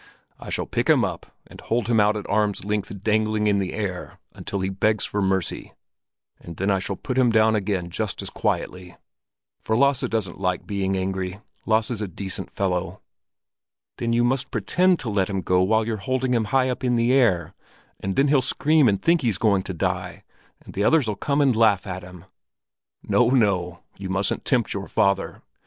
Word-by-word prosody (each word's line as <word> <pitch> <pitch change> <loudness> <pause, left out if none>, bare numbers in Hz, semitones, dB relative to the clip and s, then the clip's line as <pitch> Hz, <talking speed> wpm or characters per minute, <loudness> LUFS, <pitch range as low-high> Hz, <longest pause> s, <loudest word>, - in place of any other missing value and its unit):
I - - -9
shall - - -2
pick - - -2
him - - +5
up - - -6 0.2
and - - -13
hold 115 0 -1
him 115 -2 +3
out 105 +1 +3
at 105 - -6
arm's 105 -1 0
length 105 -1 -3
dangling 110 0 +1
in 100 -1 +3
the 95 -2 -3
air 95 -4 -5 0.2
until 100 - -5
he 95 - -1
begs 105 +3 +1
for 105 - -2
mercy; 95 -2 -1 0.6
and 85 -2 -10
then 95 +2 0
I 95 - +2
shall 100 +1 -3
put 130 +5 -3
him 125 -2 +4
down 110 0 +4
again 95 -4 -2
just - - -3
as - - -6
quietly. 90 -1 -3 0.6
For 110 - 0
Lasse 140 -1 +2
doesn't 105 -6 -3
like 90 -2 -1
being 95 -1 -1
angry. 95 0 -3 0.3
Lasse's 110 0 +1
a 105 - -2
decent 95 +2 -6
fellow." 95 -1 -2 1.0
"Then 115 -1 -1
you 120 +1 +2
must 130 +2 0
pretend 175 - +2
to 120 - -4
let 100 -1 0
him 95 -1 -2
go 90 +1 +2
while 110 +4 +2
you're 110 -1 -2
holding 130 +4 -1
him 115 -2 +1
high 130 +4 +2
up 125 - -6
in 125 -1 +2
the 120 +2 +2
air; 95 - +2 0.5
and 95 0 -3
then 140 - +3
he'll 140 -2 +4
scream 150 +3 +3
and 100 -2 0
think 170 -1 +2
he's 115 -7 0
going 100 -3 +2
to 95 - -6
die, - - -3 0.4
and - - -11
the 100 - -1
others'll 130 -5 +3
come 140 +8 0
and 135 -4 +3
laugh 110 -4 +3
at 95 -1 -5
him." 90 -1 -13 0.8
"No, 125 -1 +3
no; 95 -9 +1 0.2
you 95 -1 -5
mustn't 95 +1 -1
tempt 120 -5 +1
your 100 0 -5
father! 100 0 0
105 Hz, 195 wpm, -23 LUFS, 95-120 Hz, 1.0 s, him